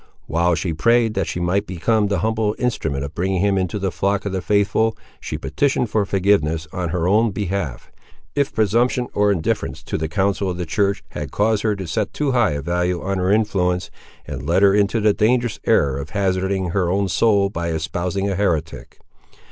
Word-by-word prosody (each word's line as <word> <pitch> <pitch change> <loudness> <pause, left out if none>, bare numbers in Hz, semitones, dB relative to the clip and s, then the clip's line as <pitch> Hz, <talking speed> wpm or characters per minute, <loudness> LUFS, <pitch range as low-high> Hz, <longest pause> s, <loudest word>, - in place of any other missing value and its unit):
While 85 +1 +1
she 85 0 -2
prayed 115 +6 +3
that 95 -4 -1
she - - -3
might 95 +4 0
become 105 +4 +1
the 100 -4 -1
humble 110 -1 0
instrument 80 - -1
of 70 +2 -6
bringing 95 +2 -1
him 100 +1 +2
into 95 0 -1
the 95 -2 -2
flock 100 +6 -1
of 100 - -2
the 95 -1 -2
faithful, 105 +3 +1 0.2
she - - -5
petitioned 130 -5 0
for 105 -2 +1
forgiveness, 80 -6 +1
on 90 -2 -2
her 85 0 -1
own 110 +4 +3
behalf, 95 - -4 0.4
if 140 0 0
presumption 120 +4 +1
or 105 0 +3
indifference 85 -5 -2
to - - -3
the 80 - -1
counsel 95 +2 0
of 90 - -3
the 90 - -3
church 100 +4 0
had 75 -2 -6
caused 105 0 +1
her 110 -2 +1
to 95 -1 -6
set 95 +6 -2
too 145 -2 0
high 120 - +2
a 70 -1 -4
value 90 +2 0
on 95 0 -2
her 90 +1 +1
influence, 95 -4 +1 0.3
and - - -6
led 90 +4 +3
her 100 -1 +6
into 105 +2 +2
the 105 -1 +4
dangerous 120 +2 +1
error 70 -1 +3
of 70 +2 -6
hazarding 95 -1 -1
her 90 -2 0
own 100 +2 +1
soul 100 0 +2
by 85 -2 -3
espousing 85 +4 -2
a 100 - 0
heretic. 85 -5 -2
95 Hz, 200 wpm, -21 LUFS, 85-105 Hz, 0.4 s, her